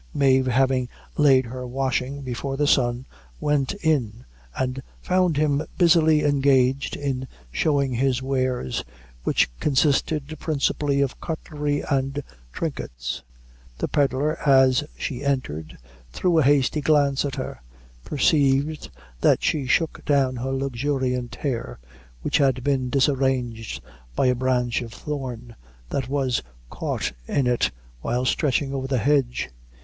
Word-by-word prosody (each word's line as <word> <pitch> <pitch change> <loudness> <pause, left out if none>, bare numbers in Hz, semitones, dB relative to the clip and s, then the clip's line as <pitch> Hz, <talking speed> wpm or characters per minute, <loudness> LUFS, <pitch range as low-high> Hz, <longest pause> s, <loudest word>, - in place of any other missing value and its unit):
Mave 130 -2 +4
having 130 0 +2 0.3
laid 135 -3 +5
her 125 +2 -6
washing 135 +2 -2
before 135 +2 -4
the 145 - +2
sun, 125 -3 +2 0.3
went 145 +3 0
in 125 -8 0 0.3
and 130 +1 -1 0.2
found 180 -4 +1
him 145 -1 +2 0.2
busily 160 -3 +5
engaged 135 -2 +2
in 130 -2 -3 0.2
showing 140 - +1
his 130 +1 +1
wares, 130 - -1 0.4
which - - +3
consisted 150 +1 +1
principally 145 -2 0
of 140 -2 -2
cutlery 150 -3 -2
and 135 0 -1 0.3
trinkets. - - -4 0.6
The - - -1
pedlar, 145 +2 +1
as 130 -1 +4
she 135 -1 -4
entered, 105 - -2 0.3
threw 170 - +2
a - - +4
hasty 145 +2 +3
glance 145 -2 +3
at 140 -2 -3
her, - - -5 0.4
perceived 145 - +1 0.3
that - - +3
she 140 -4 0
shook 160 +4 +1
down 135 -3 +2
her 130 +2 -3
luxuriant 130 -2 -1
hair, 120 - -3 0.5
which - - +1
had 130 -3 +2
been 130 -2 0
disarranged 130 -4 0 0.3
by - - +2
a 125 - +4
branch 125 -1 0
of 115 -1 -7
thorn 125 -5 -6 0.3
that 130 -2 -2
was 135 -4 0 0.3
caught - - -2 0.2
in 140 - +1
it 125 -1 +2 0.3
while 125 - -1
stretching 140 +1 +1
over 135 -1 -2
the 135 -1 0
hedge. 130 -1 +1
135 Hz, 130 wpm, -24 LUFS, 125-145 Hz, 0.6 s, laid